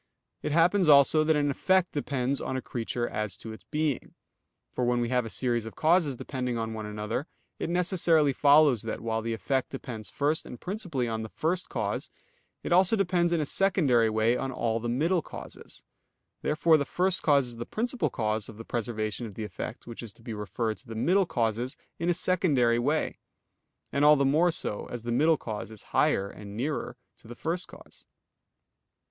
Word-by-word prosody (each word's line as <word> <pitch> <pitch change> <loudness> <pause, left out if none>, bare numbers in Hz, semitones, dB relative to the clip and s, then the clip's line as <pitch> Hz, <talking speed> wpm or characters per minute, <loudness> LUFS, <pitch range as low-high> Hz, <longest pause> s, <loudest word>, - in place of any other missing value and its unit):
It - - -2
happens 170 +2 +4
also 145 +2 +6
that 155 0 +3
an 145 -1 +2
effect 185 +5 +2
depends 140 -2 -1
on 130 - -2
a - - -3
creature 120 0 -3
as 105 -3 -3
to 110 0 -8
its 110 - -13
being. 150 -3 -2 0.6
For 125 - -2
when 120 0 +2
we 120 -1 -1
have 125 -2 +1
a - - -7
series 120 -2 0
of 115 - -9
causes 160 -3 +3
depending 125 -1 -3
on 110 0 -3
one 110 -1 -5
another, 105 +7 -3 0.3
it - - -2
necessarily 170 -4 +3
follows 145 -4 +5
that, - - -4
while 115 0 -1
the 115 0 -2
effect 130 +6 -1
depends 115 -6 -7
first 150 +6 0
and 125 - -10
principally 180 - -3
on 110 -1 -2
the 110 - -6
first 170 +8 -1
cause, 105 -4 -2 0.5
it - - -4
also 185 +4 +5
depends 175 -4 +1
in 170 - +2
a 150 - 0
secondary 140 - +3
way 110 +2 +2
on 135 +1 -2
all 115 -2 -1
the 120 +1 -3
middle 165 +9 +1
causes. - - -10 0.6
Therefore 160 +1 +3
the 145 - 0
first 180 +5 0
cause 140 -3 +4
is 120 -1 -7
the 120 - -5
principal 235 - -1
cause 110 -2 -2
of 110 - -11
the 115 - -9
preservation 115 -1 -3
of 100 - -11
the 110 - -4
effect 105 +2 -6
which 120 -1 -8
is 115 -4 -7
to 115 - -20
be 115 - -5
referred 105 +2 -3
to 125 - -17
the 115 - -7
middle 185 - +2
causes 120 +2 -1 0.2
in 170 +1 0
a - - +4
secondary 150 -11 +2
way; 145 +6 0 0.7
and 140 - +1
all 150 +1 +8
the 140 -1 +2
more 155 +6 +4
so, 135 -10 -3
as 120 -2 -6
the 120 - -3
middle 155 +6 +4
cause 110 -4 -6
is 110 -2 -11
higher 100 - +3
and 100 0 -10
nearer 140 -1 -3 0.2
to - - -16
the 120 - -9
first 170 +7 -2
cause. - - -15
130 Hz, 200 wpm, -28 LUFS, 115-160 Hz, 0.7 s, all